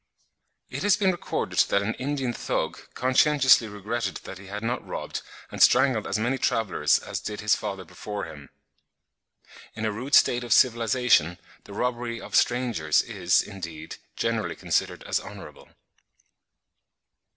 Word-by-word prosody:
It - - -4
has 205 -1 +3
been 190 -2 +3
recorded 175 - -3
that 100 - +2
an 110 +3 -1
Indian 135 -2 -2
Thug - - -3
conscientiously 130 -1 +4
regretted 105 +1 -4
that 95 - -9
he 100 - -12
had 105 +2 -6
not 120 +2 -2
robbed - - -5 0.3
and - - -5
strangled 130 -5 +4
as 95 - -1
many 125 +5 -1
travellers 110 -6 +2
as - - -5
did 105 -1 -6
his 105 +1 +2
father 95 -3 -5
before 105 +5 -6
him. 75 -4 -10 1.3
In 110 0 -3
a 110 - 0
rude 125 +7 0
state 125 0 +4
of 120 -2 +1
civilisation 115 -8 +3 0.3
the 100 - -11
robbery 120 +1 -2
of - - -11
strangers 120 -12 +2
is, 90 0 +1
indeed, 85 -5 -8 0.2
generally - - -1
considered - - -1
as - - 0
honourable. - - -11
110 Hz, 145 wpm, -26 LUFS, 100-125 Hz, 1.3 s, conscientiously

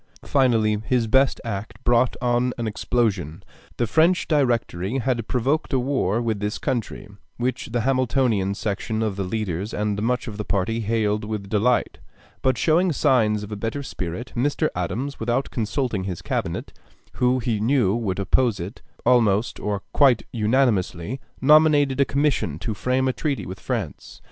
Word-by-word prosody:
Finally 115 -6 +2
his 125 -3 +2
best 130 +4 +3
act 100 -1 -4
brought 120 +1 +3
on 120 +1 +1
an 120 - -3
explosion. 105 -7 -1 0.3
The 120 - +1
French 160 - +3
Directory 120 - 0
had 125 -3 -1
provoked 135 +5 0
a 130 - +3
war 125 -5 0
with 110 -3 -1
this 105 +1 -2
country, 120 -4 -3 0.3
which 125 +1 -2
the 120 0 -1
Hamiltonian 125 -6 +1
section 110 +2 -2
of 105 -3 -1
the 100 - -3
leaders 100 0 -3
and 105 -1 -1
much 125 +2 0
of 105 -3 -6
the 105 - -3
party 105 +3 -1
hailed 105 -1 0
with 105 -2 -5
delight; 115 +4 +1 0.4
but 130 -2 +2
showing 170 +3 +3
signs 115 -8 +2
of 105 - -8
a - - -3
better 115 +7 -3
spirit, 90 0 -5
Mr. 145 +5 +1
Adams, 120 +11 -3
without 120 +4 -1
consulting 115 -3 -2
his 90 -3 -5
Cabinet, - - -3 0.4
who 125 +1 +3
he 115 -3 -1
knew 115 -3 +2
would 105 -5 -1
oppose 100 +2 +1
it 90 +7 -7 0.2
almost 110 -2 +3
or 100 -1 -3
quite 135 -6 +4
unanimously, 110 -3 +1 0.2
nominated 145 -1 +5
a - - +5
commission 135 - 0
to 110 - -3
frame 130 +5 0
a 130 - +1
treaty 145 -1 -2
with 95 +1 -7
France. - - -5
115 Hz, 160 wpm, -23 LUFS, 105-130 Hz, 0.4 s, nominated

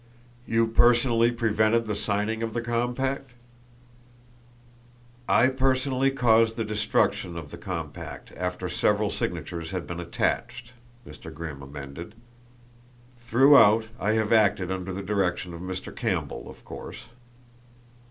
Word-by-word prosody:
"You 115 0 +3
personally 120 0 +4
prevented 115 -1 +1
the 105 - -2
signing 105 +2 -1
of 115 0 -3
the 120 - 0
compact?" 125 +3 -2 2.0
"I 130 - +5
personally 130 0 +1
caused 115 -4 +3
the 115 - -2
destruction 105 -4 0
of 80 -4 -8
the - - -8
compact - - -7
after 90 0 -3
several 105 +4 +1
signatures 85 -2 -4
had 90 -1 -4
been 85 0 -6
attached," 115 +7 -2 0.3
Mr. - - -10
Grimm 80 -3 -7
amended. 70 +8 -9 1.0
"Throughout 120 -2 +5
I 110 - +1
have 110 0 +1
acted 100 -4 +3
under 95 0 -4
the 95 +1 -5
direction 90 -3 -1
of 85 - -8
Mr. 95 0 -6
Campbell, - - -3
of - - -14
course." - - -9
110 Hz, 125 wpm, -26 LUFS, 90-120 Hz, 2.0 s, I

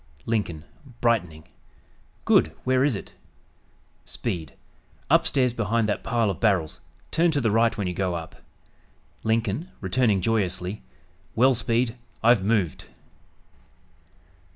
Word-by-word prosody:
Lincoln 100 -9 -2 0.4
(brightening) 90 -11 0 0.8
"Good, - - +4
where 130 0 +2
is 140 -5 +2
it?" - - -8 0.9
Speed 85 - -4 0.6
"Upstairs 125 -3 +3
behind 115 -1 0
that 105 - -2
pile 115 -3 +1
of 90 - -7
barrels 95 -8 +1 0.3
turn 170 +1 +3
to 150 -3 +1
the 115 -5 +1
right 115 +1 +2
when 100 - -2
you 90 - -2
go 90 -1 -1
up." 80 -1 -7 0.9
Lincoln 115 - 0
(returning 105 +1 +2
joyously) 95 -1 -1 0.5
"Well, 130 +3 +5
Speed, 120 0 0 0.3
I've 115 -3 +5
moved!" 100 -6 0
110 Hz, 115 wpm, -25 LUFS, 95-120 Hz, 0.9 s, Well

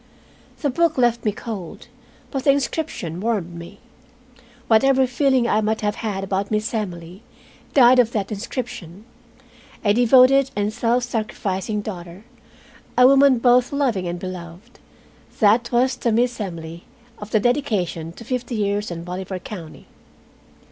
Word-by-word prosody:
The 285 - +1
book 335 +3 +1
left 240 -2 +1
me 210 - +2
cold, 205 -5 -7 0.5
but 270 -2 -3
the - - +4
inscription 275 - -1
warmed 200 -5 -2
me. 170 +4 -10 0.9
Whatever 265 +4 +4
feeling 255 -1 +1
I 215 - +2
might 220 +1 -1
have 210 0 -1
had 205 -4 -3
about 195 +1 -2
Miss 215 +1 -1
Emily 180 -3 -5 0.5
died 255 -2 +7
of 235 -2 +3
that 205 -1 -2
inscription. 210 - -6 0.8
A 205 - +4
devoted 255 +3 +5
and 205 +1 -1
self 240 +1 +1
sacrificing 215 -3 -3
daughter, 180 -1 -8 0.7
a 250 - +7
woman 275 0 +6
both 245 +1 +3
loving 250 -11 0
and 175 0 -3
beloved, 185 +4 -9 0.6
that 225 +3 +3
was 255 +2 +2
the 235 - -1
Miss 240 +1 +1
Emily 170 -3 -7 0.3
of 210 - -8
the 215 - +2
dedication 205 - -1
to 230 - -12
"Fifty 245 0 -3
years 205 0 -1
in 170 -1 -6
Bolivar 185 +2 -5
County." 175 -3 -10
215 Hz, 140 wpm, -21 LUFS, 190-245 Hz, 0.9 s, died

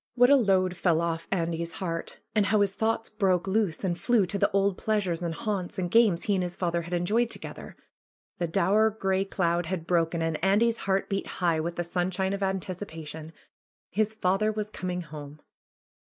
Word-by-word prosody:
What 245 +2 +6
a - - +9
load 190 -7 +2
fell 170 -3 +2
off 165 -1 -2
Andy's 170 -2 -1
heart! 165 -2 -4 0.2
And 210 -2 +3
how 215 -2 +3
his 200 -1 +2
thoughts 225 +2 0
broke 190 -4 +1
loose 195 -3 0
and 180 -3 0
flew 230 +2 +2
to 200 +3 -3
the - - +3
old 195 0 +2
pleasures, 190 -6 -1
and 170 -2 -2
haunts, 195 -4 -3
and 180 -2 -2
games 220 -7 +4
he 205 - +1
and 190 - +1
his 175 -1 -3
father 170 -2 -1
had 170 +2 -7
enjoyed 215 +7 +1
to - - -2
gether! - - -9 0.6
The 175 - 0
dour, 200 +5 +3
gray 195 -2 0
cloud 175 -3 0
had 180 -3 -3
broken, 165 -1 +1
and 160 -1 -2
Andy's 225 +4 +3
heart 190 0 +2
beat 195 0 -2
high 170 -3 +2
with 170 +2 -3
the 175 - -1
sunshine 185 +2 -1
of 200 - -3
anticipation. 165 -5 -4 0.6
His 215 +2 0
father 215 +1 +1
was 215 0 -4
coming 180 -2 -3
home. 150 -2 -9
185 Hz, 195 wpm, -27 LUFS, 170-205 Hz, 0.6 s, a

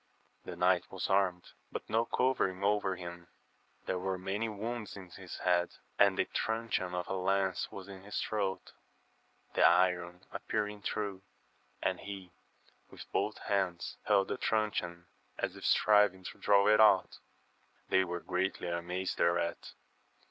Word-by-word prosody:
The 90 - -6
knight 90 0 +2
was 95 0 -3
armed, 95 -2 +1 0.2
but - - -5
no 115 +2 +2
covering 105 -8 +1
over 100 -2 +2
him; 85 -1 -8 0.6
there 90 - -1
were 95 0 -2
many 100 +5 -2
wounds 110 +1 -5
in 90 -2 -11
his 90 0 -9
head, 90 -1 +1 0.2
and 100 -1 +5
the - - +2
tnicheon 110 -5 -1
of 90 0 -3
a - - -2
lance 95 0 0
was 95 -1 -8
in 95 -2 -9
his 105 +2 -4
throat, 95 -3 -2 0.8
the - - +1
iron 90 0 +3
appear 110 -1 -1
ing 105 0 -9
through, 100 -2 -3 0.6
and - - 0
he 95 -3 -8 0.6
with - - -12
both - - 0
hands 95 -4 -1
held 100 -2 +3
the - - -2
trun 110 -1 +1
cheon, 85 -2 -4 0.3
as - - -2
if - - -11
striving 105 -3 +4
to - - -18
draw 100 0 +4
it 105 0 +6
out. 100 -3 +5 0.7
They 95 0 +4
were 90 -1 -4
greatly 90 -1 -1
amazed 90 +2 -3
thereat. 85 0 0
95 Hz, 155 wpm, -32 LUFS, 90-105 Hz, 0.8 s, it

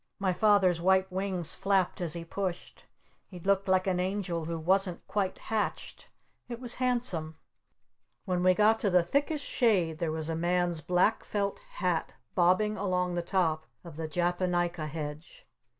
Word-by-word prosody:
My 190 -2 0
Father's 190 -4 +3
white 190 +1 +3
wings 185 -3 -2
flapped 195 -2 0
as 165 -3 +1
he 170 -1 -5
pushed! 185 0 -5 0.4
He 185 - -11
looked 195 +2 +1
like 185 0 +3
an 185 -2 0
angel 180 -3 -2
who 165 +1 -3
wasn't 185 +2 +1
quite 200 -3 -1
hatched! 220 -2 -3 0.4
It 235 -1 -5
was 245 -1 -2
handsome! 235 -11 0 0.9
When 180 -3 0
we 185 0 +4
got 215 +2 +4
to 205 - +1
the 180 -2 +4
thickest 285 - -1
shade 180 - +1
there 165 -2 -1
was 160 0 -4
a 165 - -2
man's 175 0 0
black 180 +7 +2
felt 200 -1 -2
hat - - -1 0.2
bobbing 200 +4 +3
along 180 -2 0
the 175 - -1
top 165 -3 0 0.2
of 170 -4 -10
the 160 0 -4
Japonica 175 -1 0
Hedge. 155 - -7
180 Hz, 160 wpm, -29 LUFS, 170-200 Hz, 0.9 s, we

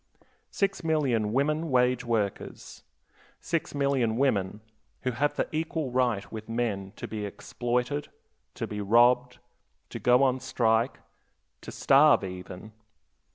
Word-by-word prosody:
Six 195 -2 -1
million 135 -10 +1
women 150 +6 0
wage 125 -1 +2
workers; 110 -4 -3 0.6
six 165 -2 -3
million 135 -5 +1
women, 105 -6 0 0.4
who 130 - 0
have 145 +5 0
the - - -1
equal 160 -3 -2
right 120 -5 0
with 110 -1 -8
men 110 -5 -2
to - - -7
be 110 -1 -5
exploited, 125 +7 -3 0.5
to - - -3
be 105 0 -5
robbed, 120 +4 +3 0.5
to - - -5
go 125 +2 +4
on 130 -1 +2
strike; 120 -2 +1
aye, - - -28 0.6
to - - -9
starve 140 -3 +5
even. 90 +2 -8
125 Hz, 130 wpm, -27 LUFS, 110-140 Hz, 0.6 s, starve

